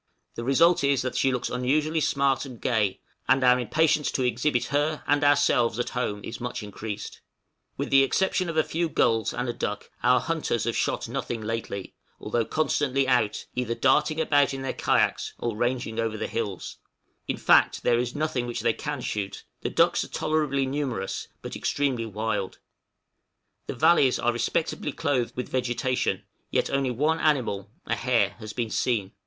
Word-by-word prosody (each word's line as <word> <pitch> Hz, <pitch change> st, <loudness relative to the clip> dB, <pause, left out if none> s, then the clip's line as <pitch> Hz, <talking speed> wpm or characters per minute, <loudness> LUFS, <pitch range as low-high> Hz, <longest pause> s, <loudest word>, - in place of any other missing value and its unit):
The 115 Hz, -, -5 dB
result 155 Hz, +6 st, +4 dB
is 140 Hz, -2 st, +2 dB
that 130 Hz, -, -3 dB
she 135 Hz, -, +2 dB
looks 125 Hz, -1 st, -2 dB
unusually 150 Hz, +6 st, +1 dB
smart 140 Hz, -3 st, +1 dB
and 130 Hz, -5 st, -9 dB
gay, 105 Hz, -6 st, 0 dB, 0.3 s
and 130 Hz, 0 st, +4 dB
our 125 Hz, 0 st, +5 dB
impatience 155 Hz, +5 st, +2 dB
to 130 Hz, -, 0 dB
exhibit 125 Hz, +2 st, +1 dB
her, 150 Hz, +2 st, 0 dB
and 145 Hz, +1 st, +2 dB
ourselves 140 Hz, -5 st, +3 dB
at 120 Hz, -, -1 dB
home 105 Hz, -5 st, -2 dB
is 115 Hz, -, -7 dB
much 125 Hz, -3 st, -4 dB
increased. 105 Hz, 0 st, -7 dB, 0.6 s
With -, -, -3 dB
the 135 Hz, 0 st, +7 dB
exception 185 Hz, +5 st, +1 dB
of 165 Hz, -, -3 dB
a 155 Hz, -, +5 dB
few 165 Hz, +2 st, -1 dB
gulls, 115 Hz, -7 st, +2 dB
and 125 Hz, -, -3 dB
a 120 Hz, -, -1 dB
duck, 105 Hz, -, -4 dB
our 125 Hz, +1 st, +4 dB
hunters 155 Hz, -7 st, -1 dB
have 115 Hz, 0 st, -1 dB
shot -, -, -1 dB
nothing 120 Hz, -, -3 dB
lately, 110 Hz, -3 st, -4 dB, 0.3 s
although 115 Hz, -1 st, -1 dB
constantly 140 Hz, -2 st, +1 dB
out, 120 Hz, -5 st, +1 dB
either 120 Hz, -2 st, -2 dB
darting 150 Hz, +5 st, +2 dB
about 145 Hz, -3 st, +3 dB
in 135 Hz, -, -5 dB
their 135 Hz, -, -2 dB
kayaks -, -, +1 dB
or 120 Hz, -2 st, -3 dB
ranging 120 Hz, -1 st, -1 dB
over 115 Hz, -1 st, -1 dB
the -, -, -2 dB
hills; 105 Hz, -6 st, -4 dB, 0.5 s
in -, -, -1 dB
fact -, -, +4 dB
there 120 Hz, -1 st, +3 dB
is 120 Hz, 0 st, -2 dB
nothing 150 Hz, -5 st, -1 dB
which 120 Hz, -, -3 dB
they -, -, +2 dB
can -, -, -4 dB
shoot; 100 Hz, -2 st, -4 dB, 0.2 s
the -, -, -2 dB
ducks -, -, +3 dB
are -, -, -8 dB
tolerably 150 Hz, -3 st, 0 dB
numerous, 130 Hz, -7 st, -3 dB, 0.2 s
but -, -, -6 dB
extremely 130 Hz, -5 st, -1 dB
wild; 110 Hz, -2 st, -3 dB, 1.1 s
the -, -, -4 dB
valleys 135 Hz, -1 st, +4 dB
are 120 Hz, -, +1 dB
respectably 145 Hz, +5 st, -1 dB
clothed 135 Hz, -5 st, -1 dB
with 125 Hz, -, -3 dB
vegetation, 125 Hz, 0 st, -1 dB, 0.3 s
yet -, -, 0 dB
only 140 Hz, -1 st, +1 dB
one 150 Hz, +7 st, +1 dB
animal 115 Hz, -10 st, 0 dB, 0.2 s
a -, -, -1 dB
hare 115 Hz, -6 st, +2 dB
has 110 Hz, -1 st, -7 dB
been 115 Hz, -1 st, -3 dB
seen. 105 Hz, -6 st, 0 dB
125 Hz, 175 wpm, -26 LUFS, 115-145 Hz, 1.1 s, the